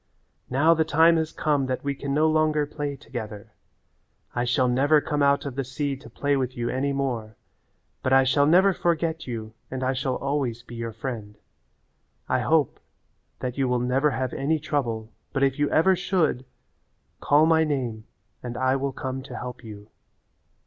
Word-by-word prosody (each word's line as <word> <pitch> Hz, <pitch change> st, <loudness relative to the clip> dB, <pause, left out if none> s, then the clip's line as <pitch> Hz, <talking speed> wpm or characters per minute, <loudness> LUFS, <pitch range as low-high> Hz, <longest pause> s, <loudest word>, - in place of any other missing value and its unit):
Now 145 Hz, +6 st, +4 dB
the 160 Hz, -1 st, +2 dB
time 165 Hz, +2 st, +4 dB
has 160 Hz, -1 st, -1 dB
come 145 Hz, -4 st, 0 dB
that 130 Hz, -1 st, -3 dB
we 140 Hz, 0 st, -1 dB
can 140 Hz, 0 st, -5 dB
no 155 Hz, +3 st, +3 dB
longer 155 Hz, -1 st, +2 dB
play 145 Hz, -1 st, -4 dB
together. 110 Hz, -7 st, -8 dB, 0.8 s
I 120 Hz, 0 st, 0 dB
shall 125 Hz, +1 st, +2 dB
never 140 Hz, +5 st, +4 dB
come 150 Hz, 0 st, -2 dB
out 140 Hz, 0 st, +3 dB
of 140 Hz, -, -4 dB
the 135 Hz, +2 st, -2 dB
sea 135 Hz, +2 st, -3 dB
to 140 Hz, -, -13 dB
play 145 Hz, 0 st, 0 dB
with 130 Hz, -2 st, -2 dB
you 120 Hz, 0 st, -1 dB
any 140 Hz, +2 st, 0 dB
more, 120 Hz, -6 st, -2 dB, 0.7 s
but 130 Hz, -, -1 dB
I 135 Hz, 0 st, +6 dB
shall 145 Hz, +2 st, +3 dB
never 190 Hz, +5 st, +5 dB
forget 165 Hz, -2 st, -1 dB
you 110 Hz, -3 st, -5 dB, 0.2 s
and 130 Hz, 0 st, -4 dB
I 130 Hz, +1 st, +1 dB
shall 130 Hz, 0 st, -1 dB
always 135 Hz, -4 st, -2 dB
be 120 Hz, -, -12 dB
your 115 Hz, -1 st, -4 dB
friend. 110 Hz, -2 st, -6 dB, 0.9 s
I -, -, +1 dB
hope -, -, +1 dB, 0.6 s
that 125 Hz, +1 st, -4 dB
you 135 Hz, -, +2 dB
will 125 Hz, 0 st, +1 dB
never 125 Hz, +4 st, +2 dB
have 130 Hz, -2 st, -2 dB
any 150 Hz, +4 st, 0 dB
trouble, 120 Hz, -7 st, -2 dB, 0.2 s
but 135 Hz, -, +1 dB
if 135 Hz, 0 st, +1 dB
you 145 Hz, -, +2 dB
ever 185 Hz, +4 st, +4 dB
should, 175 Hz, -8 st, 0 dB, 0.7 s
call 150 Hz, +2 st, +4 dB
my 160 Hz, 0 st, +4 dB
name 125 Hz, -8 st, -2 dB, 0.4 s
and 120 Hz, -1 st, -6 dB
I 130 Hz, +1 st, +2 dB
will 135 Hz, 0 st, -2 dB
come 130 Hz, 0 st, -4 dB
to -, -, -8 dB
help 125 Hz, 0 st, -7 dB
you." 105 Hz, -2 st, -11 dB
135 Hz, 185 wpm, -25 LUFS, 125-150 Hz, 0.9 s, I